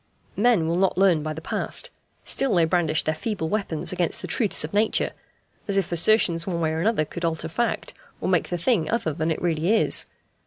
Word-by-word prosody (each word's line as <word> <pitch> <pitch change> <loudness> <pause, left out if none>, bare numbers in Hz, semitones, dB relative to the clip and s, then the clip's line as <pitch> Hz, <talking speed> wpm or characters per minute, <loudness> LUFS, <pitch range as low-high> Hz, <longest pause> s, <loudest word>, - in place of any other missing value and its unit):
Men 210 -7 +3
will 170 +1 0
not 190 -1 +1
learn 185 -5 +4
by 155 +1 -4
the 155 +1 -6
past; - - 0 0.3
still 270 -7 +1
they 170 -2 +4
brandish 160 -2 +2
their 155 - 0
feeble 160 -1 -3
weapons 190 -6 0
against 175 -2 -1
the - - -4
truths 215 -5 0
of 155 - -6
Nature, 215 +2 +2 0.6
as 200 -1 0
if 190 -3 0
assertions 170 -1 +3
one 175 -3 -2
way 160 -1 0
or 160 - -2
another 205 -5 +1
could 170 +3 -8
alter 165 -1 -1
fact, 235 +9 -2 0.3
or - - -3
make - - +1
the 175 - -2
thing 170 -3 +1
other 225 -9 -1
than 160 +1 -2
it 160 - -1
really 170 +4 +1
is. - - +2
175 Hz, 210 wpm, -24 LUFS, 160-210 Hz, 0.6 s, learn